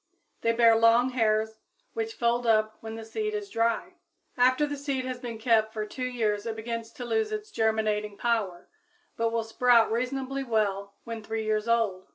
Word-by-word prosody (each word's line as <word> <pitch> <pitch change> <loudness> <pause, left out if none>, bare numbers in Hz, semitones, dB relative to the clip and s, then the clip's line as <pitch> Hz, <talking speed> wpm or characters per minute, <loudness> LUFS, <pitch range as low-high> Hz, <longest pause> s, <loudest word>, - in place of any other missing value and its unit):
They 230 - +2
bear 230 -1 +5
long 230 +3 +4
hairs, 220 -2 +1 0.3
which 445 -1 -3
fold 235 0 +1
up 215 -1 +3
when 220 0 -7
the 225 0 -8
seed 425 - -3
is 410 -1 -5
dry. 230 +11 0 0.4
After 255 +4 +4
the 290 0 -4
seed 275 -2 -3
has 255 -1 -4
been 235 -2 -6
kept 220 -1 +2
for 215 -1 -3
two 255 +4 -4
years 220 -4 -1
it 225 - -3
begins 230 0 -5
to 245 - -7
lose 440 - 0
its 425 0 -5
germinating 215 - 0
power, 215 -7 -1 0.5
but 230 0 +1
will 230 0 0
sprout 230 0 +3
reasonably 265 +3 -2
well 200 -4 -1
when 230 -1 -6
three 220 0 -3
years 215 0 0
old. 215 -5 +1
230 Hz, 185 wpm, -27 LUFS, 220-255 Hz, 0.5 s, bear